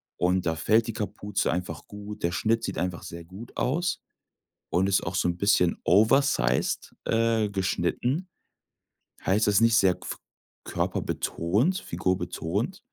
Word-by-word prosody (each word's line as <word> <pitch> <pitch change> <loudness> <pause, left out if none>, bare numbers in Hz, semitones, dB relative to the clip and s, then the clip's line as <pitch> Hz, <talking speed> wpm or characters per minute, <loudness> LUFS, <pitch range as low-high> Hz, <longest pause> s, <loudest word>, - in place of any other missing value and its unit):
und 90 +1 +1
da 80 -1 +1
fällt 110 +8 +3
die 115 - -3
Kapuze 105 -2 -2
einfach 90 -2 -4
gut, 105 0 -8
der 85 - +2
Schnitt 115 +5 +1
sieht - - -3
einfach 90 -1 -2
sehr 85 -2 -8
gut 95 +8 -11
aus 170 +8 0 0.7
und 95 +2 +2
ist 95 -1 +2
auch 85 - -4
so 95 - +1
'n 85 - -2
bisschen 90 -3 +3
oversized, 100 - +3
äh, 115 -2 +2
geschnitten. 100 - -1 1.0
Heißt, 105 +2 +3
das 105 - +3
ist - - +6
nicht 115 -2 +5
sehr 95 -2 +4
gf - - -6 0.5
körperbetont, 105 - 0
figurbetont. 95 - -2
100 Hz, 145 wpm, -27 LUFS, 90-115 Hz, 1.0 s, ist